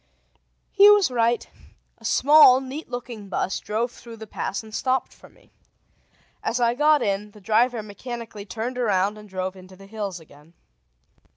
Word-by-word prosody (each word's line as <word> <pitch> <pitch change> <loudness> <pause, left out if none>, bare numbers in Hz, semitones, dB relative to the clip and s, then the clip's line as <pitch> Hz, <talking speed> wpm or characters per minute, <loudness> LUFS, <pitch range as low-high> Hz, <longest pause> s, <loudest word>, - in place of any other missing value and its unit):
He 405 +1 +7
was 410 -8 +5
right. 235 -1 +1 0.5
A - - -15
small, 285 -2 +6
neat 270 +3 -8
looking 240 -4 -7
bus 190 0 -2
drove 230 +3 -2
through 230 -2 -12
the 220 - -9
pass 200 0 -4
and 220 -1 -14
stopped 260 +2 -1
for - - -18
me. - - -26 0.9
As 245 - -2
I 235 -1 +2
got 300 +3 +3
in, 200 +1 -2
the 210 - -15
driver 225 +3 +1
mechanically 215 0 -8
turned 230 +6 -4
around 205 -2 0
and 210 -1 -14
drove 185 0 -4
into 185 0 -14
the 195 +1 -15
hills 200 -3 -5
again. 150 +1 -19
225 Hz, 165 wpm, -24 LUFS, 200-250 Hz, 0.9 s, He